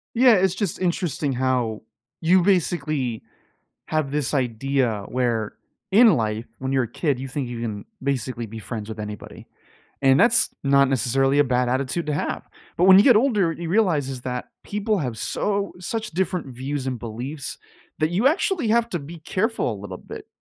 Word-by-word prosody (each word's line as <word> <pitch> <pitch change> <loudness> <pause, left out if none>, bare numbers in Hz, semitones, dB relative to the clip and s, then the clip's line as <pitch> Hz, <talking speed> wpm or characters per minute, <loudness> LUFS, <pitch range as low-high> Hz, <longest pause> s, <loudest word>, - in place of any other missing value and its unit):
Yeah, 245 -1 +6
it's 190 -1 +2
just 200 -5 -2
interesting 170 -5 -1
how 125 -4 0 0.4
you 180 +3 +4
basically 155 - 0 0.7
have 155 -3 -1
this 145 -1 -1
idea 125 -3 0
where 120 -4 -1 0.4
in 225 +2 +7
life, 110 -1 -1
when 130 0 -3
you're 135 -1 +3
a - - -7
kid, 140 -2 -1
you 135 - -5
think 135 -1 -3
you 120 -1 -6
can 105 -3 -4 0.2
basically 130 -3 -2
be 110 +1 -9
friends 110 -1 -6
with 110 -1 -7
anybody. 105 -1 -8 0.6
And 135 0 +5
that's 235 0 +5
not 140 0 +4
necessarily 135 +2 +2
a - - +7
bad 125 -2 +1
attitude 130 +6 -1
to 150 - -1
have. 145 - -2 0.3
But 175 - +2
when 190 +1 +9
you - - +6
get 245 -1 +6
older, 210 -7 +3
you 170 +1 -6
realize 170 -7 +2
is 130 -2 -6
that 125 -1 -4 0.2
people 210 0 -1
have 125 -7 -3
so 200 - -1
such 220 +5 -4
different 180 -2 -1
views 135 +2 -3
and 130 -2 -3
beliefs, 125 +6 -6 0.4
that 155 +1 0
you 205 +9 +3
actually 330 - +1
have 230 +1 +3
to 175 - -2
be 155 +4 -9
careful 195 - -1
a 100 - -9
little 95 -2 -7
bit, - - -10
140 Hz, 180 wpm, -23 LUFS, 125-185 Hz, 0.7 s, when